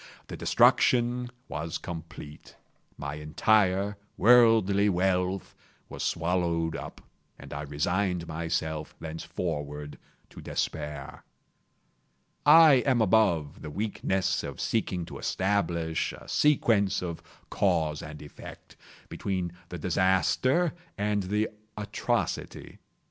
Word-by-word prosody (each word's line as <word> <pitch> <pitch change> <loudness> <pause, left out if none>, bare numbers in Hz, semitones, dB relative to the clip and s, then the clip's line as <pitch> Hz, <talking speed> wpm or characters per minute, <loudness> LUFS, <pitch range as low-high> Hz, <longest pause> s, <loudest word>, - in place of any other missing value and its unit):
The - - -5
destruction 125 0 +3 0.2
was 80 +1 -4
complete. 80 -3 -9 0.4
My 70 0 -5
entire 100 +5 +2 0.2
worldly 110 -4 +5
wealth 90 0 0 0.4
was - - -7
swallowed 85 -1 0
up, - - -8 0.4
and - - -10
I 75 - -4
resigned 85 +5 -1
myself 80 -1 -3
thenceforward 80 -3 -5 0.3
to - - -11
despair. 75 -2 -4 1.2
I 150 -4 +8
am 130 -3 +3
above 90 -8 +2
the 75 - -6
weakness 95 0 -1
of - - -7
seeking 95 -6 -1
to 80 - -9
establish 85 -5 -1
a - - -12
sequence 115 -11 +2
of 85 -2 -5 0.3
cause 75 -2 +1
and 75 -1 -9
effect, 75 - -12 0.3
between 95 -3 -3 0.2
the 90 - -6
disaster 95 - +2 0.2
and 105 0 0
the 105 +3 0 0.3
atrocity. 105 -1 -3
90 Hz, 100 wpm, -28 LUFS, 80-105 Hz, 1.2 s, I